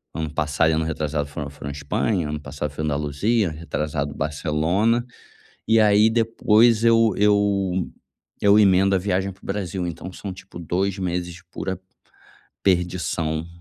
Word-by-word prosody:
Ano 80 -2 -3
passado, 75 +1 +1
ano 80 +1 +1
retrasado, 75 -2 -2
foi 75 0 -5
foi 70 -1 -9
na - - -3
Espanha, 85 +3 -1
ano 75 0 -3
passado 70 0 -5
foi 75 +2 -5
em - - 0
Andaluzia, 75 +8 0
retrasado 75 -2 -3
Barcelona, 80 - 0 0.6
e 110 +1 +4
aí 105 0 +5
depois 115 0 +3
eu 115 -2 +4
eu 100 -3 +2 0.5
eu 100 +1 +6
emendo 95 -1 +4
a - - +2
viagem 95 0 -1
para 95 - -27
o - - -14
Brasil, 95 -2 -3
então 85 +2 -7
são 100 - -6
tipo 95 -1 -12
2 95 +3 -1
meses, 90 -1 -3
pura 95 -2 -4 0.8
perdição 85 -3 0
90 Hz, 150 wpm, -23 LUFS, 75-100 Hz, 0.8 s, eu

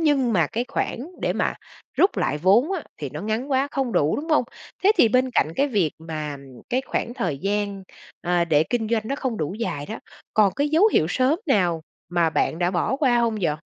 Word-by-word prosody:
nhưng 275 -7 +2
mà 170 -6 +3
cái 235 +8 -2
khoản - - -2 0.2
để - - +1
mà - - 0 0.4
rút 385 - +3
lại 150 - 0
vốn 210 - +4
á 365 -5 -2
thì 145 -3 -5
nó 150 - -5
ngắn 220 +7 -2
quá, 270 +1 +2
không 265 -4 -2
đủ, 145 +2 +2
đúng 315 +3 -5
hông? 300 -5 +4 0.4
Thế 415 - +7
thì 235 - +6
bên 255 +2 +2
cạnh 155 - +2
cái 285 +1 +2
việc 195 - +1
mà 155 -3 -5 0.3
cái 255 +2 0
khoảng 240 - -2
thời 175 - -2
gian, 200 +1 -2 0.4
ờ, 175 -1 +1
để 155 -2 +3
kinh 225 -3 0
doanh 225 -2 +1
nó 275 - -1
không 255 -6 -2
đủ 155 +5 -3
dài 145 -11 -3
đó, 220 - -6 0.4
còn 205 -3 +4
cái 285 +2 0
dấu 330 +8 +5
hiệu 155 - +3
sớm 260 - +2
nào 180 - +2 0.3
mà 170 -2 +2
bạn 160 +1 0
đã 175 0 +1
bỏ 200 +8 0
qua 255 -5 +3
hông 230 -2 +1
vậy? 155 -4 +1
220 Hz, 225 wpm, -23 LUFS, 170-265 Hz, 0.4 s, Thế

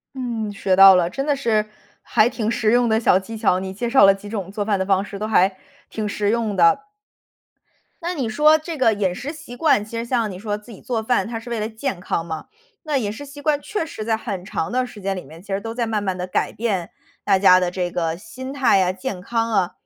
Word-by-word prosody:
嗯， 235 -5 -3
学 195 -2 0
到 195 0 +10
了， 175 -1 +2
真 270 +8 -3
的 290 - +2
是 225 -6 +1 0.4
还 215 - +3
挺 235 -3 -3
实 225 -2 +1
用 240 +1 +3
的 220 0 +3
小 185 - +4
技 225 +4 -8
巧， 205 -4 +2
你 190 0 -5
介 235 +4 -3
绍 265 - +6
了 195 0 +7
几 195 +1 -10
种 200 -4 -4
做 205 +1 -3
饭 205 -2 +1
的 190 - -1
方 195 0 +2
式 200 -1 -8
都 210 - -3
还 195 -3 +3 0.3
挺 215 -1 -3
实 205 0 -1
用 225 -2 0
的。 175 - +4 1.2
那 350 +2 -2
你 265 -8 -2
说 300 +7 +5
这 320 +1 -6
个 255 -5 +3
饮 195 -4 0
食 280 +10 -5
习 270 -6 -10
惯， 275 -8 +3
其 220 +2 -8
实 230 - -2
像 235 -3 0
你 185 - -7
说 205 +1 -3
自 210 +3 -16
己 200 - -12
做 230 -3 -2
饭 220 -4 +1
它 225 0 -5
是 230 - -11
为 235 - -2
了 215 - -2
健 220 -3 -4
康 170 -2 -2
嘛。 160 -1 -6 0.4
那 295 -3 +1
饮 210 -5 -2
食 220 +7 -7
习 285 +1 -11
惯 290 0 +1
确 415 -6 -3
实 220 - -7
在 225 0 +1
很 200 -5 -5
长 165 -4 -3
的 255 +1 0
时 235 -4 -12
间 195 0 -2
里 180 - -6
面， 160 +4 -13
其 200 - -21
实 195 - -1
都 225 +2 -5
在 235 0 -2
慢 215 -2 -1
慢 190 -2 -2
地 180 - -3
改 185 - -1
变 200 -7 -2 0.3
大 195 -2 +3
家 185 -1 +7
的 180 -1 0
这 180 -1 -2
个 165 -2 -1
心 260 +8 -8
态 270 -7 +3
呀， 185 -1 +2
健 185 0 -5
康 230 +3 -1
啊。 190 -4 +1
215 Hz, 280 characters per minute, -21 LUFS, 190-240 Hz, 1.2 s, 到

